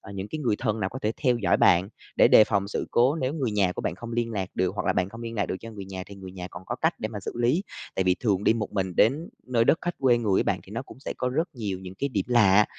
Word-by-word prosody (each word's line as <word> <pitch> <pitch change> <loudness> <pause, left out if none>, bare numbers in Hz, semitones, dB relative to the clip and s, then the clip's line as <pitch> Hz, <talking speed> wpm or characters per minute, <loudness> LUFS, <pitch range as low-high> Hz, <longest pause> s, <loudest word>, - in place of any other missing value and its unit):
ờ, 100 - -11
những 95 0 -4
cái 155 - -4
người 120 -8 0
thân 110 -3 -1
nào 95 -2 -1
có 130 - -6
thể 110 +1 +1
theo 125 -4 +2
dõi 95 -6 +2
bạn 90 +2 +4 0.3
để - - +6
đề 110 - +8
phòng 100 -2 0
sự - - -3
cố 125 +4 +4
nếu 135 -3 -1
người 135 -7 -1
nhà 100 -3 +2
của - - -5
bạn - - -1
không 120 +4 -8
liên 120 0 -1
lạc 95 -3 -2
được, 95 +1 0
hoặc 105 - -3
là 95 - +3
bạn 90 0 0
không 115 +3 -10
liên 115 0 -5
lạc 100 -4 0
được 95 - -3
cho 115 - -8
người 100 -3 -8
nhà 95 -1 -6
thì 100 - -11
người 95 -1 -10
nhà 90 -1 -7
còn - - -9
có - - -3
cách - - +1
để - - -2
mà - - -6
xử - - -5
lý. 125 +10 +2 0.3
Tại 95 - 0
vì 90 0 +4
thường 100 -4 +1
đi - - +5
một 110 -2 -3
mình 95 -3 -2
đến 145 +9 +3 0.2
nơi 120 -2 +2
đất 160 - +4
khách 175 0 -2
quê 125 -3 +4
người 105 -5 +1
ấy - - +3
bạn, - - -1
thì - - -16
nó - - -4
cũng - - -14
sẽ - - -4
có 125 - 0
rất 155 +7 0
nhiều 105 -6 -3
những 95 0 -9
cái 140 +8 -2
điểm 100 -7 -1
lạ, 105 -4 +5
105 Hz, 330 wpm, -26 LUFS, 95-120 Hz, 0.3 s, đề